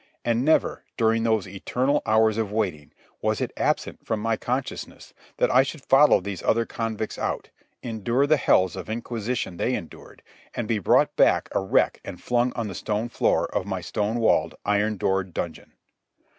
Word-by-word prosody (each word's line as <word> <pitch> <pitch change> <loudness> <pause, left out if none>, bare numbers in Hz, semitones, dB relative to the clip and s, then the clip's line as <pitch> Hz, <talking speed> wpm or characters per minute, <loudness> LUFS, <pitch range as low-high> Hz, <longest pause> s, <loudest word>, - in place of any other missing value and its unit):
And 120 +1 +1
never, 155 +3 +2
during 115 -1 +2
those 110 -4 +1
eternal 125 +9 0
hours 110 0 +3
of 105 -3 -2
waiting, 90 -9 -2 0.3
was - - 0
it - - -3
absent - - -1
from 110 - -2
my 115 +1 0
consciousness 125 +4 -5 0.2
that - - +2
I 130 - +6
should 140 +1 -5
follow 145 +3 +6
these 95 -1 -6
other 115 +1 +2
convicts 110 -2 -4
out, - - -3 0.3
endure 120 +4 0
the 155 +1 +4
hells 95 -8 +3
of 95 +2 -7
inquisition 115 -3 -3
they - - 0
endured, - - -10 0.3
and 120 - -3
be 110 -1 0
brought 95 - +3
back - - +3
a - - +1
wreck 95 - +1
and 95 -3 -8
flung 125 0 +1
on 115 -2 -3
the 100 - -6
stone 105 +5 -2
floor - - +1
of 95 - -1
my 95 -2 -3
stone 105 +5 -2
walled, 80 -8 +2
iron 105 +1 +1
doored 95 -1 -1
dungeon. 85 - -5
110 Hz, 175 wpm, -25 LUFS, 100-120 Hz, 0.3 s, I